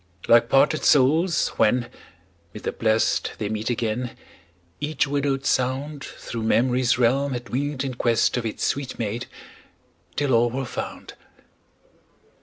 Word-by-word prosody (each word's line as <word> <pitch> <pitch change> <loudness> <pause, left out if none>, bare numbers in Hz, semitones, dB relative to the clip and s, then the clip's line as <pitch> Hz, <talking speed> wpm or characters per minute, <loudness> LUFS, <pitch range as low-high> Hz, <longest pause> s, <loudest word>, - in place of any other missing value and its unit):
Like 120 0 +5
parted 145 +3 +3
souls, 155 +6 +3
when, 120 +3 +2 0.7
mid 105 - -8
the - - -1
Blest 110 -1 +1
They 105 -2 -3
meet 110 +1 -3
again, 120 0 -2 0.6
each 145 -1 0
widowed 140 -1 -1
sound 135 +3 -1
Thro' 115 - -7
memory's 125 +2 +2
realm 135 +3 +2
had 120 -1 -6
winged 140 +1 -2
in 135 -2 -3
quest 120 -2 +1
Of 125 - -1
its 110 - -4
sweet 140 -2 -2
mate, 115 +1 -3 0.9
till 145 -3 0
all 120 +1 +4
were 130 +3 -3
found. - - -6
125 Hz, 135 wpm, -24 LUFS, 115-140 Hz, 0.9 s, Like